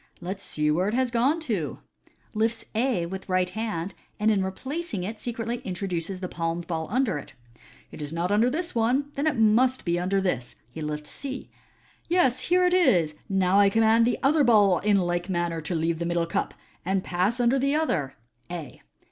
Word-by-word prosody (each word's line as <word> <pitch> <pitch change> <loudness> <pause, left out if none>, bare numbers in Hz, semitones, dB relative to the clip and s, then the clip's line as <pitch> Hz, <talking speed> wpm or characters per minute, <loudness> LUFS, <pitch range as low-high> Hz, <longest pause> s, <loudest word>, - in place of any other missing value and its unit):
" - - -29
Let 190 - -3
us - - -15
see 150 -4 0
where 180 +5 +1
it 215 - 0
has 255 -1 +1
gone 260 +7 +2
to 205 - -2 0.3
" - - -34
(lifts 225 +1 0
A 225 -6 +1
with 190 +2 -7
right 185 -1 +1
hand, 205 -5 -3 0.3
and 215 +1 +3
in 200 -3 +2
replacing 260 - -4
it 215 +3 -5
secretly 235 0 -3
intro 190 -3 -5
duces 180 +1 -3
the 185 - -2
palmed 165 0 -3
ball 160 -2 -3
under 230 - +1
it). 140 - -12 0.3
" - - -25
It - - -9
is 145 0 -5
not 170 +3 -1
under 220 +4 +4
this 330 +6 -3
one. 250 +5 +1
Then 285 +3 -1
it 300 - +1
must 230 +3 +3
be 170 0 +1
under 190 +2 +1
this." 135 -11 -2 0.2
He 160 - -7
lifts 150 0 -5
C. 275 -1 -6 0.3
" - - -33
Yes, 330 -9 +2
bere 360 +1 +4
it 360 - +3
is. 175 - +4 0.2
Now 190 0 +3
I 200 -1 +6
com 225 +3 +2
mand 225 +1 +5
the 245 - +1
other 295 +2 +4
ball 205 -7 +5
in 205 0 +3
like 175 +1 -1
manner 175 -2 -1
to 165 +3 -3
leave 165 0 0
the 170 - -2
middle 170 -1 +1
cup, 165 - -2 0.3
and 190 +1 0
pas9 185 +6 0
tinder 245 +2 +3
the 275 +2 +1
other 160 - 0 0.3
(A). 170 -6 -7
200 Hz, 215 wpm, -26 LUFS, 175-240 Hz, 0.3 s, I